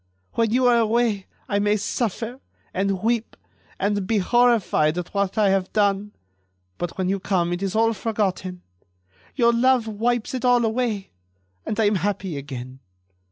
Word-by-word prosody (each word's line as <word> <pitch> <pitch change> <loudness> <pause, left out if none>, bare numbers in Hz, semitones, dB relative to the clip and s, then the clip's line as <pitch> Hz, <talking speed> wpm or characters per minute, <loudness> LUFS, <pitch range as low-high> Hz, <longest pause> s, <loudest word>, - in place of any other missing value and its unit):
When 230 -1 +1
you 250 +3 +2
are 240 -1 +5
away 225 -3 +1 0.2
I 200 - 0
may 205 +1 +2
suffer, 225 +3 -3 0.3
and 195 0 -1
weep, 230 0 0 0.4
and 200 -1 0
be 225 - +2
horrified 210 -7 +3
at 175 -1 -5
what 200 0 -1
I 210 -2 +4
have 190 -1 0
done; 205 -1 +1 0.7
but 175 -1 -4
when 185 -1 0
you 195 +1 0
come 175 -3 0
it 175 - -4
is 195 +1 -2
all 225 +1 +3
forgotten. 190 -4 -2 0.7
Your 235 -2 +4
love 250 0 +3
wipes 225 +2 -1
it 255 - -3
all 245 -2 +4
away. 220 -3 -1 0.6
And 215 - -2
I - - +4
am 205 -1 +3
happy 195 -4 -2
again.... 130 -2 -7
205 Hz, 160 wpm, -23 LUFS, 190-230 Hz, 0.7 s, are